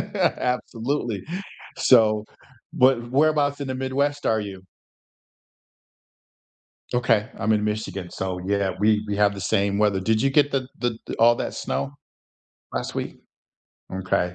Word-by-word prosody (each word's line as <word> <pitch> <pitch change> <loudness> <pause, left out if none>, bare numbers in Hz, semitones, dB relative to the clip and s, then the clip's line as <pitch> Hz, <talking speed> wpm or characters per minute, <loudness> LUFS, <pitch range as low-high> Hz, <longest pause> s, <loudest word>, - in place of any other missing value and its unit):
Absolutely. 120 -3 -1 0.5
So 110 -4 +5 0.5
but 125 -2 +3
whereabouts 145 0 +2
in 140 - -3
the 130 - -2
Midwest 140 +2 -1
are 110 -1 +2
you? 100 -2 -7 2.3
Okay, 115 -3 +2
I'm 110 +2 +1
in 105 -1 +1
Michigan, 105 -4 -3
so, 95 -1 -3
yeah, 100 -1 +1
we 105 0 +3
we 100 - -1
have 100 0 +3
the 100 - -7
same 100 0 +1
weather. 105 -2 +3
Did 110 +3 +1
you 135 - +3
get 145 0 +3
the 130 -2 -1
the 120 -2 -1 0.2
all 120 +1 +6
that - - -3
snow? 140 - -2 0.8
Last - - -3
week? - - -4 0.7
Okay. 90 -1 -1
110 Hz, 135 wpm, -24 LUFS, 100-130 Hz, 2.3 s, all